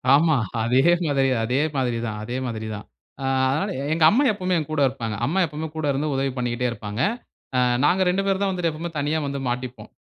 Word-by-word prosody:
ஆமா. 155 Hz, +1 st, +4 dB, 0.3 s
அதே 125 Hz, +3 st, +3 dB, 0.3 s
மாதிரி 135 Hz, -2 st, +2 dB
அதே 125 Hz, +5 st, +1 dB, 0.2 s
மாதிரி 125 Hz, -3 st, 0 dB
தான் 105 Hz, -2 st, -4 dB
அதே 120 Hz, +3 st, -4 dB
மாதிரி 110 Hz, -2 st, -4 dB
தான். 105 Hz, -, -8 dB, 0.4 s
ஆ -, -, -4 dB, 0.3 s
அதனால 190 Hz, +9 st, 0 dB, 0.2 s
எங்க 165 Hz, -, +1 dB
அம்மா 255 Hz, +9 st, +3 dB
எப்பவுமே 185 Hz, -3 st, -1 dB
என் 155 Hz, -, -2 dB
கூட 150 Hz, -2 st, 0 dB
இருப்பாங்க. 115 Hz, -4 st, -4 dB
அம்மா 170 Hz, +8 st, 0 dB
எப்பவுமே 155 Hz, +1 st, -5 dB
கூட 155 Hz, -1 st, -2 dB
இருந்து 145 Hz, +3 st, -1 dB
உதவி 135 Hz, 0 st, 0 dB
பண்ணிக்கிட்டே 125 Hz, 0 st, -1 dB
இருப்பாங்க. 105 Hz, 0 st, -5 dB, 0.6 s
அ -, -, +3 dB, 0.3 s
நாங்க 185 Hz, +5 st, +3 dB
2 190 Hz, +2 st, +1 dB
பேரு 195 Hz, -1 st, +1 dB
தான் 200 Hz, -1 st, +1 dB
வந்துட்டு 180 Hz, -3 st, 0 dB
எப்பவுமே 165 Hz, +3 st, -5 dB
தனியா 150 Hz, +2 st, 0 dB
வந்து 140 Hz, 0 st, -3 dB
மாட்டிப்போம். 125 Hz, 0 st, -4 dB
140 Hz, 205 wpm, -23 LUFS, 125-165 Hz, 0.6 s, ஆமா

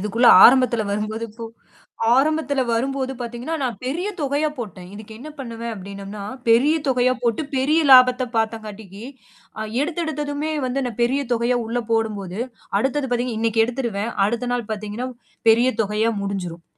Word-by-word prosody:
இதுக்குள்ள 225 Hz, +5 st, +3 dB, 0.2 s
ஆரம்பத்தில 245 Hz, -3 st, +5 dB
வரும்போது 215 Hz, +2 st, -3 dB
இப்போ 230 Hz, +2 st, -9 dB, 0.7 s
ஆரம்பத்தில 290 Hz, -1 st, +1 dB
வரும்போது 265 Hz, +3 st, -1 dB
பார்த்தீங்கன்னா, 245 Hz, +6 st, -4 dB
நான் 245 Hz, -4 st, -2 dB
பெரிய 315 Hz, +10 st, -2 dB
தொகையா 290 Hz, +1 st, 0 dB
போட்டேன். 190 Hz, -5 st, -7 dB
இதுக்கு 215 Hz, +1 st, -11 dB
என்ன 300 Hz, +5 st, -9 dB
பண்ணுவேன் 230 Hz, -2 st, -5 dB
அப்டின்னோம்னா, 200 Hz, +1 st, -8 dB, 0.3 s
பெரிய 260 Hz, +8 st, +5 dB
தொகையா 255 Hz, -1 st, +3 dB
போட்டு 235 Hz, +4 st, +1 dB, 0.2 s
பெரிய 300 Hz, +5 st, +2 dB
லாபத்த 255 Hz, 0 st, +7 dB
பார்த்தங்காட்டிக்கு, 215 Hz, -2 st, -4 dB, 0.6 s
அ -, -, -3 dB, 0.2 s
எடுத்த 320 Hz, +2 st, -3 dB
எடுத்ததுமே 295 Hz, 0 st, -3 dB
வந்து 255 Hz, +2 st, -1 dB
நான் 240 Hz, -2 st, -6 dB
பெரிய 265 Hz, +4 st, +1 dB
தொகையா 240 Hz, +1 st, +1 dB
உள்ள 230 Hz, +2 st, -2 dB
போடும்போது, 210 Hz, -4 st, -1 dB, 0.4 s
அடுத்தது 270 Hz, +4 st, 0 dB
பார்த்தீங்கன்னா 245 Hz, -2 st, -1 dB
இன்னைக்கு 225 Hz, 0 st, +2 dB
எடுத்துருவேன். 235 Hz, -3 st, -3 dB, 0.2 s
அடுத்த 235 Hz, +3 st, -2 dB
நாள் 240 Hz, -3 st, -3 dB
பார்த்தீங்கன்னா 215 Hz, +3 st, -4 dB, 0.4 s
பெரிய 235 Hz, +3 st, +5 dB
தொகையா 215 Hz, +2 st, 0 dB
முடிஞ்சிரும். 180 Hz, -4 st, -4 dB
235 Hz, 145 wpm, -22 LUFS, 215-265 Hz, 0.7 s, லாபத்த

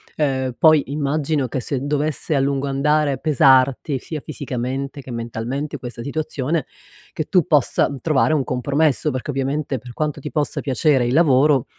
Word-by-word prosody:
Ehm, 130 Hz, -4 st, -1 dB
poi 155 Hz, -3 st, +5 dB
immagino 145 Hz, -1 st, -1 dB
che, 130 Hz, -, -2 dB
se 130 Hz, +2 st, -2 dB
dovesse 150 Hz, +2 st, -1 dB
a 140 Hz, -, +2 dB
lungo 140 Hz, 0 st, 0 dB
andare 145 Hz, +1 st, +1 dB
pesarti, 135 Hz, -1 st, +3 dB
sia 155 Hz, +3 st, -6 dB
fisicamente, 135 Hz, -1 st, -4 dB
che 130 Hz, -, -10 dB
mentalmente 120 Hz, +5 st, -4 dB
questa 120 Hz, -1 st, -7 dB
situazione, 150 Hz, +2 st, -2 dB, 0.5 s
che 155 Hz, -, -3 dB
tu 180 Hz, -1 st, +2 dB
possa 150 Hz, -4 st, +2 dB
trovare 155 Hz, -1 st, +2 dB
un 145 Hz, -4 st, +1 dB
compromesso, 140 Hz, +4 st, +1 dB
perché 130 Hz, +2 st, -4 dB
ovviamente 135 Hz, 0 st, -2 dB
per 125 Hz, +2 st, -11 dB
quanto 150 Hz, +4 st, -3 dB
ti 150 Hz, -, -6 dB
possa 150 Hz, -2 st, -1 dB
piacere 135 Hz, -2 st, +2 dB
il 120 Hz, -, 0 dB
lavoro, 140 Hz, -3 st, +4 dB
140 Hz, 160 wpm, -21 LUFS, 130-150 Hz, 0.5 s, poi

